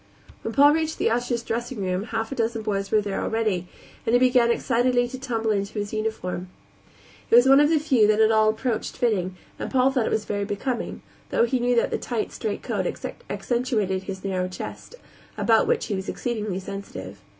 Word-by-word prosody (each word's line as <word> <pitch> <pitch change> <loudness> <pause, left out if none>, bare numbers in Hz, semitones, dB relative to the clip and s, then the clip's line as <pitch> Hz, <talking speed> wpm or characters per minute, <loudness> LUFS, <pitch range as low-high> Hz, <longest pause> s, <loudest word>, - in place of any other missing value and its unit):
When 225 - -4
Paul 285 +4 +6
reached 320 0 -1
the - - +1
ushers' 240 0 0
dressing 240 +2 -3
room 185 +2 -1
half 225 +1 -3
a - - -3
dozen 230 -2 -1
boys 195 -2 -2
were 215 - +3
there 200 -1 -3
already, 215 -6 -1 0.4
and 225 - 0
he 245 - +6
began 250 -2 +4
excitedly 245 +1 +2
to 260 +1 -7
tumble 230 -4 -1
into 200 0 -1
his 205 0 -3
uniform. 215 -5 -3 0.8
It - - +5
was 245 +2 +7
one 270 +1 +7
of 295 0 +5
the 320 - +4
few 265 -8 +3
that 215 0 +3
at 220 0 +5
all 215 -1 +4
approached 220 +1 -2
fitting, 190 -6 0 0.2
and - - -4
Paul 260 0 +3
thought 255 -4 0
it 220 - +1
very 205 -1 -2
becoming 225 +5 -3 0.3
though - - +3
he 250 +2 0
knew 245 0 +2
that 235 - +2
the - - -1
tight, 230 -4 -3
straight 210 -2 -4
coat - - -1 0.4
accentuated 220 -7 -1
his 190 -1 -6
narrow 185 -2 -1
chest, 185 - -8 0.4
about - - +3
which 480 -2 +1
he 215 - -3
was 190 0 -3
exceedingly 215 -6 -3
sensitive. 185 - -7
225 Hz, 200 wpm, -24 LUFS, 200-245 Hz, 0.8 s, was